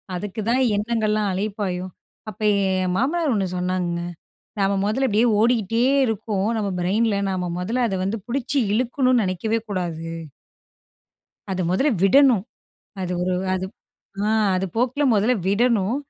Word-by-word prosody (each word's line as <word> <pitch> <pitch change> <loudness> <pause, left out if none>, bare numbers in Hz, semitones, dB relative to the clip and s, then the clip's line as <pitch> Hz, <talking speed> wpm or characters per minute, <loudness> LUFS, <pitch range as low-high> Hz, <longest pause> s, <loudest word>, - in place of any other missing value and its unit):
அதுக்குதான் 215 +6 -1 0.2
எண்ணங்கள்லாம் 215 -1 0
அலைப்பாயும். 190 -2 -3 0.4
அப்ப 215 - -11 0.4
என் 180 -1 -1
மாமனார் 295 - +1
ஒண்ணு 195 -2 0
சொன்னாங்கங்க 180 -1 -1 0.6
நம்ம 195 0 +2
முதல 260 +6 +1
அப்டியே 220 +2 +3
ஓடியிட்டே 230 0 +2 0.2
இருக்கோம். 210 -2 -1
நம்ம 210 -2 -1
பிரைன்ல 205 +4 +1
நம்ம 185 -1 -2
மொதல்ல 230 +8 -1
அத 195 - -2
வந்து 205 +4 -2
புடிச்சு 265 +2 -1
இழுக்கணுனு 250 +2 +2
நெனைக்கவே 205 +4 -1
கூடாது. 170 -4 -3 1.4
அத 185 -1 -1
மொதல்ல 270 +11 +2
விடணும். 245 0 +5 0.6
அது 180 -1 -3
ஒரு 180 0 0 0.2
அது 185 0 -2 0.6
ஆ - - +2 0.3
அது 190 +1 -1
போக்குல 255 +5 +1
முதல்ல 215 +5 +3
விடணும். 220 +1 +2
210 Hz, 125 wpm, -22 LUFS, 185-235 Hz, 1.4 s, விடணும்